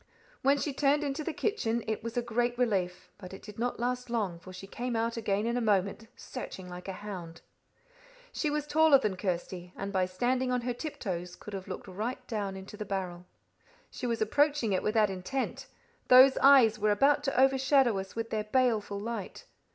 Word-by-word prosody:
When 275 Hz, +2 st, +4 dB
she 285 Hz, 0 st, -2 dB
turned 285 Hz, +2 st, +2 dB
into 285 Hz, +1 st, -2 dB
the 335 Hz, -, -2 dB
kitchen, 235 Hz, -, -1 dB
it 220 Hz, -1 st, -3 dB
was 230 Hz, +1 st, -5 dB
a 240 Hz, -, +1 dB
great 240 Hz, +1 st, 0 dB
relief; 185 Hz, -7 st, -1 dB
but 190 Hz, -1 st, -9 dB
it -, -, -14 dB
did 210 Hz, 0 st, -10 dB
not 245 Hz, 0 st, -1 dB
last 250 Hz, +1 st, -2 dB
long, 205 Hz, -8 st, -1 dB
for 185 Hz, -, -12 dB
she 185 Hz, +1 st, -9 dB
came 240 Hz, +4 st, -4 dB
out 230 Hz, +1 st, 0 dB
again 210 Hz, -2 st, -1 dB
in 235 Hz, +1 st, 0 dB
a -, -, 0 dB
moment, 205 Hz, 0 st, 0 dB
searching 190 Hz, -7 st, -8 dB
like 180 Hz, +1 st, -9 dB
a -, -, -2 dB
hound. 175 Hz, -5 st, -7 dB, 0.9 s
She 305 Hz, -, -1 dB
was 295 Hz, 0 st, -1 dB
taller 310 Hz, -1 st, +5 dB
than 215 Hz, -7 st, -1 dB
Kirsty, 180 Hz, -1 st, -4 dB
and 200 Hz, +1 st, -4 dB
by 185 Hz, -1 st, +2 dB
standing 250 Hz, +7 st, 0 dB
on 250 Hz, -1 st, +1 dB
her 245 Hz, +1 st, -2 dB
tiptoes 185 Hz, -, -5 dB
could 210 Hz, -, -11 dB
have 190 Hz, -1 st, -6 dB
looked 185 Hz, -, -7 dB
right 225 Hz, +7 st, -4 dB
down 205 Hz, -4 st, -3 dB
into 190 Hz, +2 st, -9 dB
the 210 Hz, -, -4 dB
barrel. 185 Hz, -3 st, -4 dB, 0.6 s
She 250 Hz, -, -4 dB
was 230 Hz, -2 st, 0 dB
approaching 285 Hz, -1 st, +2 dB
it 185 Hz, -, +1 dB
with 210 Hz, -, -1 dB
that 210 Hz, -3 st, +4 dB
intent 190 Hz, +9 st, -4 dB, 0.4 s
those 260 Hz, +1 st, +8 dB
eyes 255 Hz, -6 st, +6 dB
were 210 Hz, 0 st, +2 dB
about 275 Hz, +8 st, +3 dB
to 275 Hz, -, 0 dB
overshadow 265 Hz, -4 st, +4 dB
us 190 Hz, 0 st, -8 dB
with 225 Hz, 0 st, -4 dB
their 215 Hz, -1 st, -1 dB
baleful 215 Hz, -4 st, +1 dB
light. 220 Hz, -2 st, -6 dB
225 Hz, 200 wpm, -30 LUFS, 195-255 Hz, 0.9 s, those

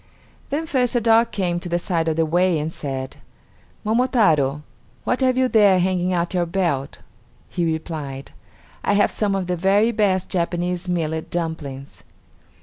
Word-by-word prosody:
Then 300 Hz, +4 st, -2 dB
first 255 Hz, -5 st, 0 dB
a -, -, +4 dB
dog 230 Hz, 0 st, +4 dB
came 175 Hz, -5 st, -1 dB
to 175 Hz, -, -7 dB
the 170 Hz, -, +1 dB
side 170 Hz, -2 st, -1 dB
of 160 Hz, -, +1 dB
the 165 Hz, 0 st, +2 dB
way 175 Hz, +2 st, +2 dB
and 155 Hz, +2 st, -3 dB
said, 135 Hz, -2 st, -5 dB, 0.7 s
"Momotaro! 205 Hz, -, +2 dB, 0.4 s
What 250 Hz, -, -1 dB
have 255 Hz, -1 st, +2 dB
you 260 Hz, 0 st, +3 dB
there 205 Hz, -5 st, +5 dB
hanging 180 Hz, 0 st, +1 dB
at 175 Hz, 0 st, -1 dB
your 175 Hz, -2 st, 0 dB
belt?" 165 Hz, -7 st, -1 dB, 0.5 s
He 175 Hz, -, -1 dB
replied, 150 Hz, -4 st, -5 dB, 0.5 s
"I -, -, +2 dB
have 205 Hz, -, +3 dB
some 205 Hz, -2 st, 0 dB
of 190 Hz, -1 st, -1 dB
the 180 Hz, 0 st, -1 dB
very 200 Hz, +6 st, +3 dB
best 200 Hz, -4 st, +1 dB
Japanese 175 Hz, +1 st, -2 dB
millet 160 Hz, -2 st, -2 dB
dumplings." 155 Hz, -5 st, -5 dB
180 Hz, 160 wpm, -22 LUFS, 160-205 Hz, 0.7 s, there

